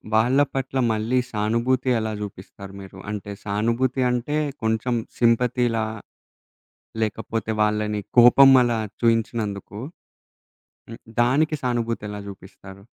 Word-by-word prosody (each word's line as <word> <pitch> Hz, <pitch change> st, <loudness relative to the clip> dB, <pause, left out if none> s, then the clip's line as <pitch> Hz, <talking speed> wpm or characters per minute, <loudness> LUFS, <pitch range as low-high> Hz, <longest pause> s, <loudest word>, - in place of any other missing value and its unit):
వాళ్ళ 125 Hz, +5 st, +3 dB
పట్ల 135 Hz, 0 st, -3 dB, 0.2 s
మళ్ళీ 115 Hz, +4 st, 0 dB
సానుభూతి 115 Hz, +4 st, 0 dB
ఎలా 110 Hz, 0 st, -3 dB
జూపిస్తారు 100 Hz, 0 st, -9 dB
మీరు? 95 Hz, 0 st, -12 dB
అంటే 105 Hz, -1 st, -6 dB
సానుభూతి 115 Hz, +6 st, 0 dB
అంటే 125 Hz, +5 st, -1 dB, 0.3 s
కొంచెం 110 Hz, +2 st, 0 dB, 0.2 s
సింపతీ‌లా 115 Hz, -1 st, +2 dB, 1.2 s
లేకపోతే 110 Hz, 0 st, -3 dB
వాళ్ళని 105 Hz, 0 st, -1 dB, 0.2 s
కోపం 135 Hz, +3 st, +8 dB
అలా 120 Hz, -2 st, 0 dB, 0.2 s
చూయించినందుకు, 110 Hz, -3 st, -1 dB, 1.1 s
హ్మ్. 115 Hz, -, -9 dB, 0.2 s
దానికి 145 Hz, +6 st, +2 dB
సానుభూతెలా 115 Hz, -4 st, -2 dB
జూపిస్తారు? 95 Hz, 0 st, -13 dB
115 Hz, 95 wpm, -23 LUFS, 105-125 Hz, 1.2 s, కోపం